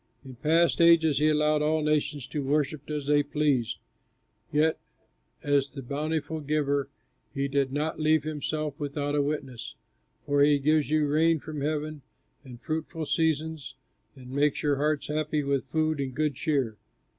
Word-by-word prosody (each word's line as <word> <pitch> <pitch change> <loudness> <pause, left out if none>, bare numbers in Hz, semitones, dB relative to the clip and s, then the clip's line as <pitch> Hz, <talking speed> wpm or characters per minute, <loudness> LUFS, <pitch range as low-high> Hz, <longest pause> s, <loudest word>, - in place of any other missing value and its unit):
In 130 - -9
past 165 +5 +2
ages 160 -4 +5
he 155 +1 +4
allowed 150 0 +2
all 155 +1 +1
nations 150 -3 0
to 150 - -4
worship 145 +1 -1
as 150 -2 -3
they 145 0 +4
pleased; 145 -5 0 0.7
yet 155 +2 +2 0.6
as 140 -1 +2
the 135 -2 -8
bountiful 155 +4 -2
Giver 145 -1 0 0.5
he 140 0 0
did 140 -1 0
not 150 +3 -2
leave 155 -1 +3
himself 155 -1 -3
without 145 0 -2
a 145 - +2
witness, 140 -4 -4 0.5
for 145 0 +2
he 145 0 +5
gives 150 +1 +2
you 155 0 +2
rain 160 +3 +3
from 155 -1 -7
heaven 150 0 -2 0.4
and 125 -3 -11
fruitful 160 +2 -4
seasons 160 -3 -1 0.4
and 130 -2 -12
makes 145 +1 +1
your 145 -2 +2
hearts 150 +1 0
happy 150 0 -1
with 140 -1 0
food 155 -1 0
and 130 -2 -4
good 150 0 0
cheer." 130 -6 -1
150 Hz, 155 wpm, -27 LUFS, 140-155 Hz, 0.7 s, ages